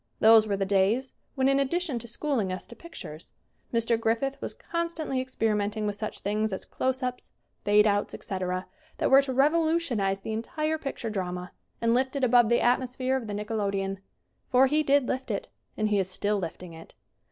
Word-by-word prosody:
Those 220 Hz, 0 st, +7 dB
were 200 Hz, -1 st, 0 dB
the 195 Hz, -, 0 dB
days 205 Hz, +7 st, +1 dB, 0.2 s
when 265 Hz, -1 st, +2 dB
in 275 Hz, 0 st, +3 dB
addition 280 Hz, -1 st, 0 dB
to 235 Hz, -, -9 dB
schooling 235 Hz, -5 st, -1 dB
us 185 Hz, -, -4 dB
to 235 Hz, -, -12 dB
pictures 170 Hz, -, -10 dB, 0.4 s
Mr. 230 Hz, 0 st, +2 dB
Griffith 230 Hz, +5 st, 0 dB
was -, -, -5 dB
con 335 Hz, 0 st, -2 dB
stantly 310 Hz, -6 st, -3 dB
experimenting 215 Hz, -4 st, -1 dB
with 205 Hz, -1 st, -1 dB
such 215 Hz, +1 st, -5 dB
things 215 Hz, +2 st, 0 dB
as 190 Hz, -, -4 dB
close 260 Hz, 0 st, -2 dB
ups, 250 Hz, 0 st, -4 dB, 0.3 s
fade 210 Hz, +1 st, +5 dB
outs, 205 Hz, -1 st, +1 dB
etc., 185 Hz, -1 st, -3 dB, 0.3 s
that -, -, 0 dB
were 270 Hz, +1 st, +8 dB
to 275 Hz, -1 st, -3 dB
revolu 315 Hz, +5 st, +3 dB
tionize 200 Hz, -12 st, -1 dB
the 220 Hz, -, -3 dB
entire 305 Hz, +8 st, -2 dB
picture 270 Hz, -6 st, -4 dB
drama 180 Hz, -2 st, -4 dB, 0.3 s
and 230 Hz, 0 st, +2 dB
lift 260 Hz, +3 st, +1 dB
it 275 Hz, -, -1 dB
above 240 Hz, -2 st, +5 dB
the 235 Hz, -, +3 dB
atmosphere 255 Hz, +1 st, +1 dB
of 250 Hz, -4 st, -3 dB
the 210 Hz, -, -4 dB
nickelodeon. 200 Hz, -2 st, -2 dB, 0.5 s
For 260 Hz, +1 st, +6 dB
he 300 Hz, +3 st, +2 dB
did 280 Hz, -3 st, +3 dB
lift 260 Hz, 0 st, -3 dB
it. -, -, -3 dB, 0.3 s
And 215 Hz, 0 st, +1 dB
he 205 Hz, -1 st, +2 dB
is 190 Hz, -1 st, -1 dB
still 205 Hz, +2 st, 0 dB
lifting 170 Hz, 0 st, -6 dB
it. 165 Hz, 0 st, -13 dB
230 Hz, 195 wpm, -27 LUFS, 205-265 Hz, 0.5 s, were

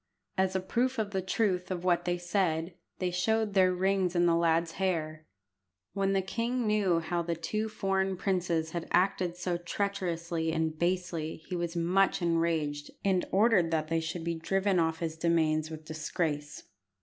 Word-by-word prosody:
As 190 Hz, 0 st, +1 dB
a -, -, +3 dB
proof 245 Hz, +7 st, 0 dB
of 215 Hz, -2 st, -1 dB
the 190 Hz, -1 st, -1 dB
truth 185 Hz, -1 st, 0 dB
of 180 Hz, -2 st, -3 dB
what 175 Hz, -2 st, +2 dB
they 175 Hz, 0 st, 0 dB
said, 175 Hz, -2 st, 0 dB, 0.2 s
they 180 Hz, -1 st, -1 dB
showed 220 Hz, +4 st, +1 dB
their 185 Hz, -2 st, +5 dB
rings 190 Hz, 0 st, +1 dB
in 175 Hz, 0 st, +4 dB
the 170 Hz, -1 st, +4 dB
lad's 165 Hz, 0 st, +2 dB
hair. 155 Hz, -4 st, -1 dB, 0.7 s
When 195 Hz, 0 st, +1 dB
the 195 Hz, -1 st, +1 dB
king 235 Hz, +5 st, -1 dB
knew 200 Hz, -6 st, +2 dB
how 170 Hz, +2 st, -1 dB
the 170 Hz, 0 st, -2 dB
two 215 Hz, +7 st, -2 dB
foreign 195 Hz, -3 st, 0 dB
princes 175 Hz, -4 st, 0 dB
had 170 Hz, 0 st, -4 dB
acted 180 Hz, -1 st, +1 dB
so 180 Hz, -1 st, -1 dB
treacherously 170 Hz, -3 st, -2 dB
and 160 Hz, -1 st, 0 dB
basely 170 Hz, -2 st, -1 dB
he 185 Hz, -, -3 dB
was 170 Hz, 0 st, -3 dB
much 180 Hz, +3 st, +2 dB
enraged, 165 Hz, -4 st, 0 dB, 0.2 s
and 190 Hz, -2 st, +2 dB
ordered 200 Hz, -4 st, +4 dB
that 155 Hz, -1 st, -1 dB
they 165 Hz, 0 st, +2 dB
should 160 Hz, +1 st, -4 dB
be 170 Hz, 0 st, -1 dB
driven 195 Hz, +2 st, +1 dB
off 160 Hz, 0 st, 0 dB
his 160 Hz, -1 st, -2 dB
demesnes 160 Hz, -2 st, +1 dB
with 155 Hz, -1 st, -8 dB
disgrace. 155 Hz, -1 st, -3 dB
175 Hz, 175 wpm, -30 LUFS, 165-190 Hz, 0.7 s, their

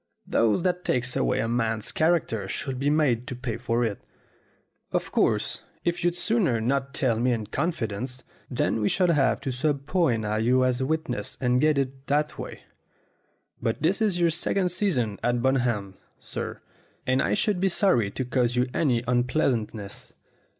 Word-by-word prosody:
Those 115 Hz, +8 st, +2 dB
that 180 Hz, -1 st, 0 dB
take 125 Hz, 0 st, 0 dB
away -, -, +1 dB
a -, -, -1 dB
man's 115 Hz, -2 st, -1 dB
character 155 Hz, -, +1 dB
should 130 Hz, +6 st, -4 dB
be 140 Hz, +2 st, +1 dB
made 140 Hz, -6 st, +2 dB
to 125 Hz, -, -4 dB
pay 120 Hz, -2 st, -4 dB
for 120 Hz, 0 st, 0 dB
it. 105 Hz, -3 st, -3 dB, 0.9 s
Of -, -, -1 dB
course, -, -, +1 dB, 0.2 s
if 175 Hz, 0 st, 0 dB
you'd 175 Hz, 0 st, +1 dB
sooner 175 Hz, -, +1 dB
not 135 Hz, +4 st, -1 dB
tell 120 Hz, -6 st, +1 dB
me 125 Hz, +2 st, +2 dB
in 110 Hz, -2 st, -2 dB
confidence, 125 Hz, -, -3 dB, 0.3 s
then 120 Hz, -3 st, 0 dB
we 105 Hz, -, +2 dB
shall 180 Hz, -2 st, +3 dB
have 145 Hz, -4 st, +2 dB
to 135 Hz, -, -2 dB
subpoena 135 Hz, -, 0 dB
you 125 Hz, +3 st, +3 dB
as 130 Hz, 0 st, +1 dB
a 130 Hz, -, 0 dB
witness 160 Hz, +1 st, -2 dB
and 125 Hz, -1 st, +2 dB
get 155 Hz, -1 st, +3 dB
it 135 Hz, -1 st, -2 dB
that 150 Hz, +1 st, 0 dB
way; -, -, -7 dB, 1.0 s
but 115 Hz, +4 st, -1 dB
this 190 Hz, +7 st, +2 dB
is 200 Hz, -5 st, +1 dB
your 170 Hz, -1 st, +3 dB
second 180 Hz, +3 st, 0 dB
season 130 Hz, -, 0 dB
at 120 Hz, -1 st, 0 dB
Bun 130 Hz, +1 st, +3 dB
ham, 105 Hz, -6 st, -1 dB, 0.2 s
sir, -, -, -6 dB, 0.4 s
and 130 Hz, +1 st, +2 dB
I -, -, +1 dB
should 205 Hz, -3 st, +1 dB
be 195 Hz, +1 st, +2 dB
sorry 170 Hz, -, +2 dB
to 130 Hz, +6 st, -4 dB
cause 125 Hz, -1 st, +1 dB
you 125 Hz, 0 st, +3 dB
any 125 Hz, -7 st, +1 dB
un 120 Hz, 0 st, +2 dB
pleasantness." 115 Hz, -7 st, -2 dB
130 Hz, 175 wpm, -26 LUFS, 115-155 Hz, 1.0 s, shall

